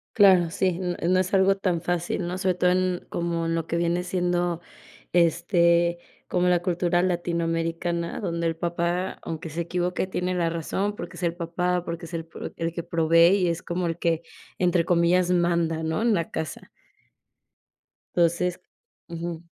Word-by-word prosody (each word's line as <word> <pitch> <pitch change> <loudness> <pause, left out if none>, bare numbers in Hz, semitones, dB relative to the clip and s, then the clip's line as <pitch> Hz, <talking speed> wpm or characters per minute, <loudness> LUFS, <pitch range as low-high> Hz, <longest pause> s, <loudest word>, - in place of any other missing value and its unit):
Claro, 185 -5 +6
sí, 185 -2 0
n 180 -1 -2
no 185 - +4
es 185 +1 -1
algo 195 0 +4
tan 180 -4 0
fácil, 175 0 -2
¿no? 180 +1 -3
Sobre 185 -1 +1
todo 180 0 +2
en 185 0 +1
como 170 -1 -2
lo 165 -1 -1
que 170 - -2
viene 170 +1 0
siendo, 175 -1 0 0.5
este, 170 0 +3 0.3
como 180 0 +1
la 175 -1 +3
cultura 175 -1 +1
latinoamericana, 170 -1 -1
donde 170 -3 -2
el 165 -1 0
papá, 170 +2 -1
aunque 165 0 -5
se 165 +3 -3
equivoque, 180 +2 -1
tiene 180 -1 -2
la 170 -2 +1
razón 195 +5 -2
porque 175 - -8
es 180 - -7
el 170 - +1
papá, 175 +1 -1
porque 170 0 -5
es 165 - -12
el 165 -1 -3
pro - - -7
el 165 0 -3
que 170 - -3
provee 165 +1 +4
y 180 - +2
es 170 0 -2
como 175 0 -2
el 165 - -2
que, 170 -1 0 0.4
entre 175 -2 +2
comillas, 175 +1 +3
manda, 170 -2 +1
¿no? 160 +6 -1
En 230 -2 +3
la 165 -4 -1
casa. 160 - -5 1.5
Enonces 175 +1 +2 0.5
ujú. 170 0 -5
175 Hz, 170 wpm, -25 LUFS, 170-180 Hz, 1.5 s, Claro